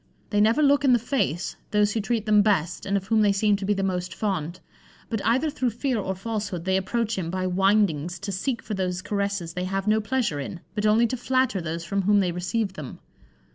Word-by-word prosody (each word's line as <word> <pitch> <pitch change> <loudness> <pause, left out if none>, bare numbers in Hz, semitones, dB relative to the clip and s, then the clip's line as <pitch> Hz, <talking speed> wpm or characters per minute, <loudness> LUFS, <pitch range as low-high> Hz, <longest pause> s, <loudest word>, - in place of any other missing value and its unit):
They 205 -1 +3
never 225 +8 +4
look 285 0 +4
in 265 -3 +5
the - - +6
face 225 - -1
those 210 0 +2
who 225 - 0
treat 220 +1 -1
them 210 -1 +5
best, 195 -5 0
and 200 +1 +2
of 195 - -4
whom 220 +1 +2
they 205 -1 +4
seem 205 +1 +2
to 200 - -5
be 205 +1 +1
the 195 - -1
most 180 -1 -2
fond; 185 -4 -2 0.5
but 225 -3 -2
either 255 +8 +2
through 255 -4 0
fear 240 +1 -1
or 190 -1 -2
falsehood, 200 -3 -4
they 190 0 +2
approach 220 +3 -1
him 165 -3 -3
by 185 +1 -2
windings 185 -3 +2
to 200 0 -4
seek 235 +6 -2
for 215 - -5
those 185 -2 -2
caresses 200 -4 -2
they 180 +1 -3
have 195 +1 -2
no 215 +1 +3
pleasure 215 - -1
in, 165 +5 -6
but 210 0 0
only 220 +3 +4
to 255 +2 -2
flatter 255 -4 +1
those 165 +1 -4
from 195 +4 -1
whom 205 +2 +4
they 185 -3 +1
receive 190 +4 -2
them. 150 -8 -8
200 Hz, 230 wpm, -25 LUFS, 185-225 Hz, 0.5 s, the